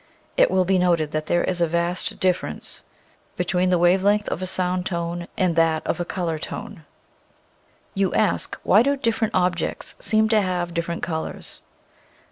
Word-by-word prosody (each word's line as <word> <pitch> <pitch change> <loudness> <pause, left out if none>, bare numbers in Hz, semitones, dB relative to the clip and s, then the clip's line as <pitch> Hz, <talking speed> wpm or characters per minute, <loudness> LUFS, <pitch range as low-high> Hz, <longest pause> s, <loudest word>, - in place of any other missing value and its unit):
It - - +4
will 185 -1 +2
be 190 0 +2
noted 170 -4 +1
that 155 0 -3
there 175 - +1
is 180 -2 -1
a 170 - +3
vast 170 +2 -1
dif 185 -1 +2
ference - - -8 0.6
between 180 +1 +1
the 180 - +3
wave 175 +2 +3
length 205 +1 +2
of 170 - -4
a 185 - -3
sound 180 0 0
tone 170 0 -4
and 185 -5 +1
that 165 -1 +2
of - - -2
a 175 - -2
color 170 -3 -3
tone. - - -8 1.1
You 195 -2 0
ask, 215 - +4
why 205 - +5
do 280 +3 +2
different 230 -3 -1
objects 180 -1 -1
seem 220 0 +2
to 220 -2 +4
have 180 -2 -2
different 170 0 -3
colors 160 -2 -4
180 Hz, 175 wpm, -23 LUFS, 170-190 Hz, 1.1 s, why